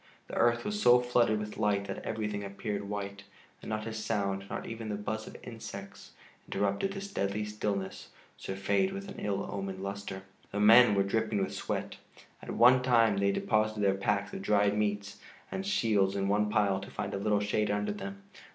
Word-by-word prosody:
The - - -9
earth 120 0 +3
was 210 0 -2
so 125 0 +7
flooded 120 -3 +2
with 105 0 -6
light 100 -2 +1
that - - -6
everything 105 -2 -3
appeared 100 0 -4
white, 100 -1 -4 0.4
and - - -8
not 110 0 -2
a 115 - -4
sound, 100 -3 -1
not - - -4
even 115 -1 -6
the 105 - -1
buzz 110 +1 -4
of - - -9
insects, 110 -4 -9 0.3
interrupted 100 - 0
this 195 0 -5
deadly 100 +2 -1
stillness 105 -2 -3 0.3
surfeited 145 - 0
with 195 0 -6
an - - -8
ill 100 -1 -1
omened 95 -1 -4
luster. 100 -1 -5 0.3
The 105 - -2
men 110 +1 +8
were 100 - +3
dripping 105 0 0
with - - -4
sweat. - - -3 0.4
At 125 +2 +5
times 115 -5 +4
they 100 0 +3
deposited 110 +1 +1
their 100 -1 +4
packs 95 0 -1
of - - -5
dried 100 0 +3
meats 105 -1 -1 0.3
and 190 - -3
shields 110 - +2
in 100 -1 0
one 105 +1 +2
pile 100 -3 +2
to 95 - -9
find - - -4
a 100 - -2
little 105 +1 +2
shade 105 +1 0
under 105 0 0
them. 100 -1 -7
105 Hz, 190 wpm, -31 LUFS, 100-110 Hz, 0.4 s, men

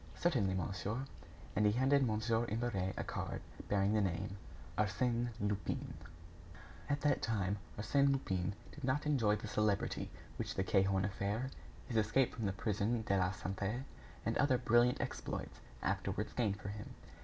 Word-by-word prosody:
"Certainly, 120 - +2
monsieur." 95 +7 -2 0.5
And 105 - +3
he 105 0 +5
handed 135 +3 +4
Mon. 110 -4 +1 0.3
Imbert 105 -4 -1
a - - -1
card - - -3 0.3
bearing 100 0 +3
the 110 - +4
name: 95 +1 -1 0.4
"Arsène 120 +3 +1
Lupin." 100 -1 -1 1.0
At 145 0 +1
that 145 - +3
time, 100 -3 0 0.2
Arsène 140 +6 +3
Lupin 95 -8 0 0.2
did 150 - -11
not 130 +3 +1
enjoy 120 -8 +3
the 105 - -6
celebrity 105 -1 0 0.3
which - - -3
the 95 - +1
Cahorn 95 -1 +3
affair, 105 +6 -1 0.4
his 115 - -1
escape 110 +4 +3
from 115 -3 -2
the - - +1
Prison 105 +3 0
de 100 -2 +1
la 90 -1 +3
Santé, 100 +5 -3 0.4
and 115 - +1
other 140 -3 +4
brilliant 120 +1 +4
exploits, - - -4 0.2
afterwards - - -1
gained 105 -5 +1
for 100 - -5
him. 105 +1 -7
105 Hz, 155 wpm, -36 LUFS, 100-120 Hz, 1.0 s, he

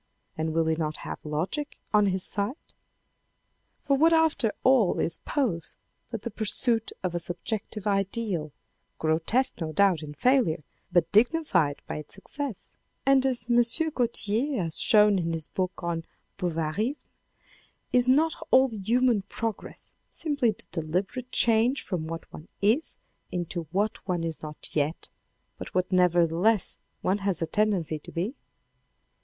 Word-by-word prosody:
And 160 0 -1
will 165 +1 +1
he 160 0 +2
not 155 -1 -2
have - - -5
logic 170 - -3 0.2
on 210 -1 +5
his 190 -1 0
side? 205 +6 0 1.3
For 280 - +2
what 325 +4 +5
after 320 -9 +3
all 255 -8 +4
is 165 - +1
pose 205 - -1 0.3
but 230 -4 -5
the 235 - -4
pursuit 225 +2 +2
of 180 -2 -1
a 175 - -1
subjective 200 +4 -3
ideal, 195 -5 -1 0.5
grotesque 165 +11 0
no 160 -1 -2
doubt 185 -1 +3
in 150 -1 -8
failure, 190 - +2 0.3
but 175 -2 +2
dignified 220 - +2
by - - -4
its 150 -1 -7
success. 250 +2 -6 0.3
And 275 -1 +5
as 255 -2 -1
M. 240 0 +5 0.3
Gaultier 235 - 0
has 165 -1 -3
shown 210 -3 +5
in 165 -1 -1
his 160 -2 -3
book 185 +1 -3
on 170 -1 -2 0.4
Bovarysme, 180 - -1 0.9
is 250 0 +4
not 315 +5 +4 0.2
all 260 +1 +6
human 230 +1 +2
progress 215 +2 -5 0.2
simply 285 -7 0
the 215 - -4
deliberate 185 +10 -3
change 235 +4 +3
from 170 -5 -3
what 165 0 -5
one 155 - -10
is, 225 +10 +2 0.3
into 175 -2 -3
what 205 +4 0
one 175 -3 0
is 165 -2 -4
not 150 -1 -7
yet, 150 +2 -1 0.5
but - - -8
what 185 +1 +1
nevertheless 180 +3 +3 0.2
one 190 +3 +1
has 195 -2 -1
a - - +1
tendency 185 -6 0
to - - -12
be 185 +9 -2
200 Hz, 145 wpm, -27 LUFS, 165-240 Hz, 1.3 s, all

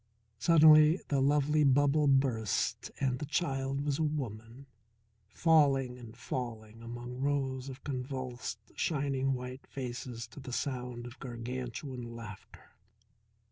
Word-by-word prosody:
Suddenly 155 - +7
the 140 -2 +2
lovely 150 +2 +3
bubble 145 +2 +4
burst 130 -6 +1
and 130 -2 0
the 150 - -3
child 135 -3 -1
was 145 0 0
a - - +2
woman, 125 -4 -4 0.6
falling 135 -4 +3
and 115 -1 -11
falling 115 -3 -5
among 120 +2 -7
rows 135 -1 -1
of 130 - -10
convulsed, 130 -4 -4 0.2
shining 135 -3 0
white 125 +1 -7
faces 125 -2 -5
to - - -11
the 130 -2 -7
sound 125 -3 -3
of 120 +2 -10
gargantuan 125 0 -5
laughter. 105 -4 -11
130 Hz, 120 wpm, -32 LUFS, 120-140 Hz, 0.6 s, Suddenly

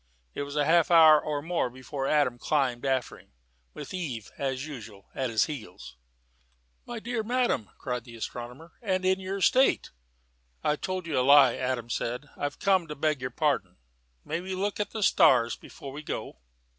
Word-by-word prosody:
It - - -4
was 140 0 -5
half 160 +4 +3
an 175 - +5
hour 155 -2 +8
or 145 -1 -2
more 165 -5 0
before 130 +2 -5
Adam 140 -5 +2
climbed 135 -3 0
after 130 -2 -1
him, - - -23 0.4
with - - -8
Eve, 135 - -5
as 135 0 -3
usual, 110 -9 -10
at 130 -2 -2
his 110 -1 +2
heels. 110 - -8 0.9
"My 240 -1 -5
dear 235 0 -2
madam!" 235 - 0
cried 125 -3 -4
the 120 -2 -11
astronomer, 125 +7 -7
"and 185 -4 -1
in 190 0 +3
your 190 +1 -4
state!" 260 +7 +3 0.7
"I 150 - +2
told 185 +3 -4
you 155 -6 0
a - - +3
lie," 135 -1 +7
Adam 125 -2 -2
said. 125 +6 -3
"I've 145 0 -3
come 190 -4 +2
to 150 - -6
beg 150 -1 0
your 125 - -2
pardon. 125 - -1 0.5
May 170 - -2
we 190 +1 -4
look 200 +2 -2
at 205 -1 -1
the 220 -2 -3
stars 160 -12 +5
before 135 - -11
we 145 +3 -7
go?" 145 - -6
145 Hz, 180 wpm, -28 LUFS, 125-180 Hz, 0.9 s, hour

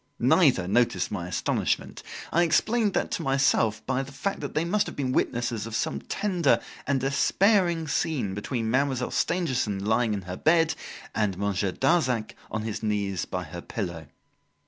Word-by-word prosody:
Neither 90 - +4
noticed 120 +4 +1
my 90 -4 -3
astonishment. 90 - -1 0.3
I 170 - +3
explained 215 +5 +2
that - - 0
to - - -2
myself 135 -6 +2
by 130 0 0
the 135 +1 -8
fact 195 +9 -3
that - - -6
they 155 +2 +1
must 205 +4 +1
have - - -7
been 130 -3 -1
witnesses 120 -3 -1
of 115 - -5
some - - -1
tender 185 -7 +1 0.3
and 140 -1 +2
despairing 170 - +2
scene 135 -8 -1
between 110 +2 -2
Mademoiselle 130 -1 +1
Stangerson, 130 - 0
lying 110 0 +2
in 100 - -5
her 90 0 -6
bed, 165 0 +3 0.4
and 105 -4 0
Monsieur 100 -1 0
Darzac 130 - +1 0.2
on 110 0 -3
his 110 -2 -4
knees 100 -4 -1
by 90 - -4
her 85 +1 -8
pillow. 85 -8 -5
125 Hz, 165 wpm, -26 LUFS, 105-160 Hz, 0.4 s, Neither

